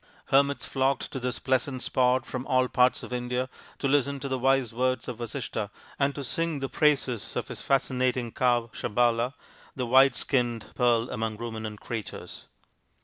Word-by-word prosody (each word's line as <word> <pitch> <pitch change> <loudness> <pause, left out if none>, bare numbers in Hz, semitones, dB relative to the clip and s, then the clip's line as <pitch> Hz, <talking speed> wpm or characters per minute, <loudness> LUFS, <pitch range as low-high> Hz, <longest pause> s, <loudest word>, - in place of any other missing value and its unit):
Hermits 140 +1 +3
flocked 135 0 0
to 135 - -4
this 125 -1 -2
pleasant 130 0 0
spot 125 0 +2
from 130 0 -5
all 130 0 +3
parts 125 0 +3
of - - -7
India 125 +1 -2 0.3
to 140 - -1
listen 140 0 +2
to 140 - -3
the 130 -1 -1
wise 135 -2 +2
words 130 0 0
of 120 -2 -5
Vasishtha 115 -3 -4 0.3
and 140 0 +2
to 140 - -4
sing 165 +5 -1
the 135 -1 -2
praises 130 -6 +1
of - - -3
his - - -5
fascinating 130 -3 +1
cow, 120 -2 +1
Sabala, 120 +2 +1 0.4
the 125 - -2
white 130 +1 +6
skinned 120 -5 0
Pearl 120 -1 +2
among 110 -2 -2
Ruminant 110 -2 -5
Creatures. 115 -3 -6
125 Hz, 165 wpm, -27 LUFS, 120-135 Hz, 0.4 s, white